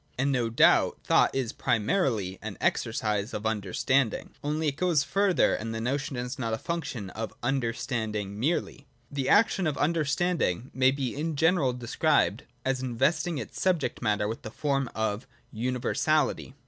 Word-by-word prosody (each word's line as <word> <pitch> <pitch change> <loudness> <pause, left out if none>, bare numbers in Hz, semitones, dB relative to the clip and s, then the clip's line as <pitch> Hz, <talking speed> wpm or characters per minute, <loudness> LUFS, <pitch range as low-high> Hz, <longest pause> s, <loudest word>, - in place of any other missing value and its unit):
And 135 +2 +1
no 120 -4 +1
doubt 115 - +4
thought - - +4
is 130 -3 -1
primarily 110 - 0
an - - -6
exercise 105 0 0
of 105 - -5
Understanding: 110 +4 0
— - - -36
only 150 +1 0
it 140 - -6
goes 165 -3 +2
further, 195 +4 +2
and 115 +1 -3
the - - -3
notion 135 +3 -2
is 125 +2 -4
not 115 -2 -1
a - - -6
function 130 - -4
of 110 0 -5
Understanding 115 -5 -2
merely. 145 +1 -1 0.2
The 140 -2 -2
action 205 -4 +4
of 150 - -1
Understanding 155 - 0
may 130 0 +4
be 135 -3 -2
in 155 +2 -2
general 160 -3 +3
described 125 -1 +1 0.2
as 130 -1 0
investing 145 +7 0
its - - -6
subject 180 -5 0
matter 105 -3 +1
with 110 +2 -4
the - - -7
form 135 +1 -1
of 110 +2 -2 0.2
universality. 130 +5 0
130 Hz, 160 wpm, -28 LUFS, 115-150 Hz, 0.2 s, doubt